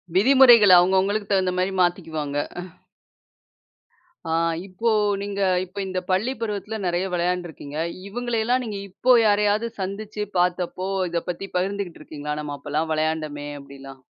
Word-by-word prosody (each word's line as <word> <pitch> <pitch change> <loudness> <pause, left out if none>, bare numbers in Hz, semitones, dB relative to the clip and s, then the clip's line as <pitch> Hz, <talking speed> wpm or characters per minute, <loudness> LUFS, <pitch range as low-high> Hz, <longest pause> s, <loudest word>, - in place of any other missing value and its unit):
விதிமுறைகள் 235 -2 +7
அவுங்க 180 +2 +4
அவுங்களுக்கு 205 +2 0
தகுந்தமாரி 185 0 +1
மாத்திக்குவாங்க. 160 -5 -1 1.9
ஆ - - -1 0.4
இப்போ 225 +5 -1 0.3
நீங்க 200 0 -4 0.2
இப்ப 185 +2 -20
இந்த 185 -1 -2
பள்ளி 215 +8 +1
பருவத்தில 210 0 -3
நிறைய 175 +1 0
விளையாண்டு 180 0 0
இருக்கீங்க. 145 -1 -9 0.3
இவுங்களை 240 +2 -2
எல்லாம் 250 +1 +1
நீங்க 210 -3 -5
இப்போ 250 +7 +3
யாரையாவது 210 +2 +2
சந்திச்சு 210 +2 -4
பார்த்தப்போ, 180 +1 0 0.2
இத 170 -1 -1
பத்தி 180 +3 -4
பகிர்ந்துகிட்டு 195 -2 -3
இருக்கீங்களா? 150 -1 -5
நம்ம 145 -1 -5
அப்பல்லாம் 150 +3 -2
விளையாண்டமே! 155 -2 -2
அப்பிடிலாம். 135 -1 -12
185 Hz, 125 wpm, -23 LUFS, 160-205 Hz, 1.9 s, விதிமுறைகள்